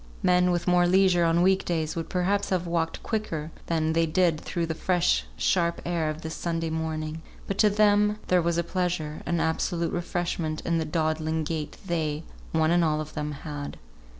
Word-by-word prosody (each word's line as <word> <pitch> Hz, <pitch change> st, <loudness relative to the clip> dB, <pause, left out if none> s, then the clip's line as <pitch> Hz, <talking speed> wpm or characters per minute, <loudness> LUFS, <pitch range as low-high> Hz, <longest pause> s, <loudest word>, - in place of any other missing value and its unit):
Men 180 Hz, 0 st, +4 dB
with 175 Hz, 0 st, 0 dB
more 180 Hz, 0 st, +4 dB
leisure 185 Hz, -1 st, +4 dB
on 165 Hz, +1 st, +3 dB
week 190 Hz, +1 st, +3 dB
days 160 Hz, -3 st, -1 dB
would 165 Hz, -1 st, -4 dB
perhaps 195 Hz, +3 st, 0 dB
have 180 Hz, -2 st, 0 dB
walked 165 Hz, -1 st, -1 dB
quicker 165 Hz, -9 st, -3 dB, 0.2 s
than 160 Hz, -1 st, +1 dB
they 165 Hz, 0 st, +2 dB
did 165 Hz, -1 st, +2 dB
through 170 Hz, -2 st, -2 dB
the 165 Hz, -, -2 dB
fresh 160 Hz, -, +1 dB
sharp 170 Hz, -2 st, +1 dB
air 170 Hz, -3 st, 0 dB
of 155 Hz, +2 st, -5 dB
this 160 Hz, 0 st, -4 dB
Sunday 165 Hz, -1 st, -2 dB
morning; 160 Hz, 0 st, -3 dB, 0.2 s
but 195 Hz, -, -4 dB
to 215 Hz, -, +6 dB
them 210 Hz, 0 st, +3 dB
there 180 Hz, -1 st, +4 dB
was 170 Hz, 0 st, 0 dB
a 170 Hz, -, +2 dB
pleasure, 170 Hz, -3 st, -2 dB
an 170 Hz, -1 st, +1 dB
absolute 165 Hz, +1 st, 0 dB
refreshment 170 Hz, -2 st, -2 dB
in 170 Hz, -1 st, +1 dB
the 160 Hz, -, -1 dB
dawdling 155 Hz, 0 st, 0 dB
gait 155 Hz, -1 st, -4 dB
they, 160 Hz, -3 st, -1 dB, 0.3 s
one 160 Hz, 0 st, +2 dB
and 175 Hz, 0 st, +4 dB
all 155 Hz, -1 st, +1 dB
of 155 Hz, 0 st, -6 dB
them, 150 Hz, -1 st, -3 dB
had. 145 Hz, -2 st, -6 dB
165 Hz, 190 wpm, -27 LUFS, 160-180 Hz, 0.3 s, to